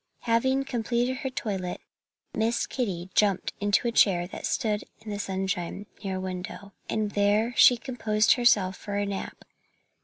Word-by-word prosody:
Having 260 +4 +2
completed 245 0 -1
her 270 -1 -3
toilet 195 -7 -3 0.5
Miss 225 +2 +1
Kitty 190 -8 -3
jumped 200 -3 +2
into 205 +3 +2
a - - +1
chair 185 -6 +4
that 180 - -5
stood 210 -2 0 0.2
in 220 -1 -7
the 205 - -4
sunshine, 190 -1 -3 0.2
near 190 -1 -2
a - - -3
window. 185 +2 -6 0.2
And 215 -1 -1
there 210 +4 +2
she 245 - +7
composed 225 -3 +2
herself 215 -6 +3
for 205 +1 -6
a 205 0 0
nap. 200 -1 -6
210 Hz, 155 wpm, -27 LUFS, 190-235 Hz, 0.5 s, she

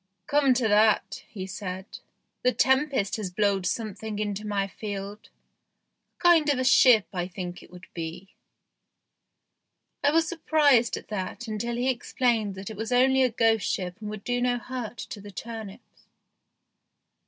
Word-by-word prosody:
"Come 280 -1 +3
to 245 -2 +1
that," 215 0 +3
he 190 -4 -6
said, 190 0 -7 0.4
"the 250 - +3
tempest 265 -5 +1
has 210 -4 -4
blowed 195 0 +1
something 220 -1 -4
into 210 0 -3
my 200 -1 0
field. 200 +1 -7 0.9
A - - -17
kind 335 -4 +5
of 280 - 0
a 255 - 0
ship 250 -4 +6
I 175 -1 -2
think 180 -1 -7
it - - -16
would 180 +1 -13
be." 170 +3 -7 1.7
I 285 - +5
was 325 +2 +3
surprised 300 -8 +3
at - - -11
that 210 +3 -5
until 225 +2 -3
he 245 +2 -1
explained 235 -4 0
that 190 +3 -7
it 215 - -9
was 225 +2 -4
only 265 +2 +4
a 255 - +4
ghost 225 -2 +2
ship 180 -1 -3
and 210 - -5
would 210 -1 -7
do 245 0 -1
no 245 0 +1
hurt 245 -1 -6
to 205 - -7
the 205 - -10
turnips. 220 +1 -9
220 Hz, 160 wpm, -26 LUFS, 195-250 Hz, 1.7 s, ship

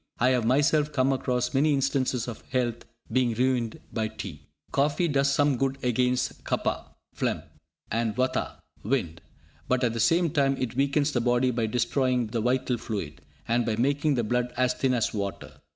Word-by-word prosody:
I 125 +2 +3
have 125 -3 +2
myself 145 +4 +3
come 135 -1 +2
across 125 -1 -1
many 145 +2 +3
instances 130 -3 0
of 120 - -6
health 120 -3 -1 0.3
being 125 -3 +2
ruined 125 -2 0
by 110 -1 0
tea. 90 -9 -8 0.2
Coffee 145 +5 +2
does 140 -2 +2
some 145 -1 +2
good 135 +1 0
against 125 +1 0
Kapha - - -1 0.3
(phlegm) - - -1 0.5
and 115 -1 0
Vatha 130 +1 -1 0.2
('wind'), 90 -9 -1 0.5
but 130 0 +1
at 120 -2 +2
the 115 - -3
same 165 +6 +3
time 135 -2 +2
it 125 -3 -2
weakens 140 +2 +2
the 120 - 0
body 125 +1 +2
by 115 -2 -1
destroying 125 +2 +1
the 115 +1 -2
vital 125 0 0
fluid, 80 -12 -5 0.3
and 120 +1 +2
by 110 -2 -1
making 140 +5 +1
the 120 - 0
blood 125 +2 0
as 125 0 +2
thin 130 -1 +1
as 115 - 0
water. 100 -2 -5
125 Hz, 175 wpm, -27 LUFS, 115-135 Hz, 0.5 s, I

